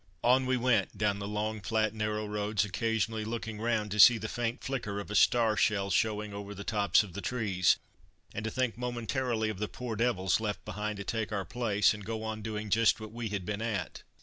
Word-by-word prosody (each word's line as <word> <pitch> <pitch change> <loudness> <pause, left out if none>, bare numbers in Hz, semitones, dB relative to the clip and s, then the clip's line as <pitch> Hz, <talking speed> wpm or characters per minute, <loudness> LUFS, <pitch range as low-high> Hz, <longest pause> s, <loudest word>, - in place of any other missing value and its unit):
On 130 +2 +4
we 130 0 +2
went 120 -5 +1
down 100 -1 +1
the 100 - -4
long, 105 +1 -2
flat, 110 +1 0
narrow 105 0 -2
roads, 105 0 0
occasionally 110 +1 -1
looking 110 -1 -4
round 110 -3 0
to 105 - -2
see 120 +3 +9
the 110 0 -4
faint 120 +1 -3
flicker 115 -7 -3
of 100 - -7
a - - -2
star 115 0 +4
shell 100 -2 +1
showing 105 -1 0
over 100 0 -7
the 100 - -7
tops 100 0 +3
of 95 -4 -10
the 100 - -5
trees, 100 -8 +2 0.6
and 105 - -4
to 110 - -1
think 125 -1 -1
momentarily 120 -1 -1
of 105 -3 -5
the 105 - -1
"poor 125 -1 -5
devils" 105 -5 +1
left 105 -2 -3
behind 105 0 -3
to 100 - -5
take 110 0 -2
our 100 -2 -2
place, 110 0 +2
and 105 -1 -8
go 110 +1 -4
on 110 0 -4
doing 105 -1 -4
just 115 +2 +4
what 110 -1 -8
we 115 -1 -4
had 100 -3 -3
been 105 +2 -3
at. 105 -6 -3
110 Hz, 220 wpm, -30 LUFS, 105-115 Hz, 0.6 s, see